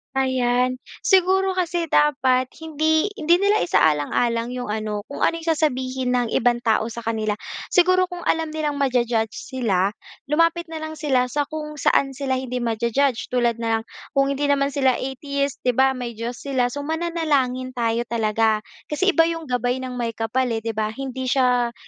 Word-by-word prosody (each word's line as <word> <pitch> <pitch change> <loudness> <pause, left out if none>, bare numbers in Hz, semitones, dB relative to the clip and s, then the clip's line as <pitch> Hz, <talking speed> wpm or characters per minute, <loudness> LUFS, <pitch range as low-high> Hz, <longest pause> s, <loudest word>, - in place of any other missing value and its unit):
Ayan, 255 -1 +1 0.2
siguro 380 0 +3
kasi 345 -2 -1
dapat 260 -4 +3 0.2
hindi 315 +3 +1
hindi 325 +2 +4
nila 405 +1 +3
isaalang-alang 230 - +1
'yong 250 -3 -5
ano, 215 -1 -2
kung 280 - 0
ano - - +2
yung 330 - -3
sasabihin 260 -5 0
ng 245 -1 +1
ibang 240 0 +2
tao 220 -2 +2
sa 235 +1 -6
kanila. 220 -2 -1 0.4
Siguro 370 +1 +4
kung 355 -1 -8
alam 320 -2 0
nilang 300 -2 -2
ma-ju-judge 240 -5 +1
sila, 205 -8 0 0.4
lumapit 330 +2 +2
na 325 - -5
lang 315 0 -5
sila 280 -5 +1
sa 285 +3 -2
kung 300 -1 -6
saan 275 -1 +2
sila 265 -1 -1
hindi 250 -1 -3
ma-ju-judge, 235 +3 0
tulad 240 -2 +2
na 225 -1 0
lang, - - -16 0.3
kung 275 -1 +2
hindi 280 +1 -1
naman 280 -1 +2
sila 265 -2 +2
atheist, 280 +1 -3
'di 250 - +3
ba? 265 +1 +3
May 245 -2 -5
Diyos 230 +2 -5
sila 260 -3 +1
so 285 +3 -5
mananalangin 295 -6 -1
tayo 235 -1 0
talaga. 220 -1 +1 0.2
Kasi 375 +6 +1
iba 330 - +7
'yong 330 -4 -4
gabay 250 +1 0
ng 255 -1 -5
Maykapal 230 +2 -1
eh, 225 - -2
'di 225 -1 -4
ba? 215 0 -1
Hindi 260 +1 -5
siya, 250 -2 +2
260 Hz, 175 wpm, -22 LUFS, 235-300 Hz, 0.4 s, iba